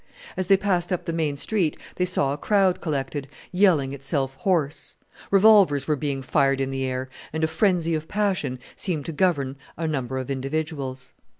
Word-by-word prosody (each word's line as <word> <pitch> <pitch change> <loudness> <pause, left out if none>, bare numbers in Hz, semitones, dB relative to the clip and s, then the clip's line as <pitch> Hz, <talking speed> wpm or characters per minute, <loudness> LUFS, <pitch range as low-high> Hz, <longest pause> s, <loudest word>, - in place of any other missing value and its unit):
As 185 -1 -2
they 195 - +6
passed 190 -2 0
up 180 - -1
the 165 - -2
main 155 -3 0
street 170 +2 0 0.2
they 180 - +2
saw 140 -6 +1
a - - -4
crowd 195 -1 +2
collected, 140 -2 -3 0.2
yelling 175 -8 +3
itself 135 -1 -2
hoarse. 160 -6 -1 0.3
Revolvers 195 -9 +5
were 155 - +2
being 140 -2 -3
fired 135 +1 +2
in 135 0 -1
the 135 0 -2
air, 130 0 -3 0.2
and 160 +1 -2
a - - +4
frenzy 170 0 +1
of 155 0 -2
passion 190 -11 0 0.2
seemed 160 -7 -2
to - - -4
govern 145 -5 0 0.2
a 165 0 -2
number 130 -4 -2
of 130 +1 -4
individuals. 135 -1 -4
155 Hz, 180 wpm, -24 LUFS, 135-180 Hz, 0.3 s, they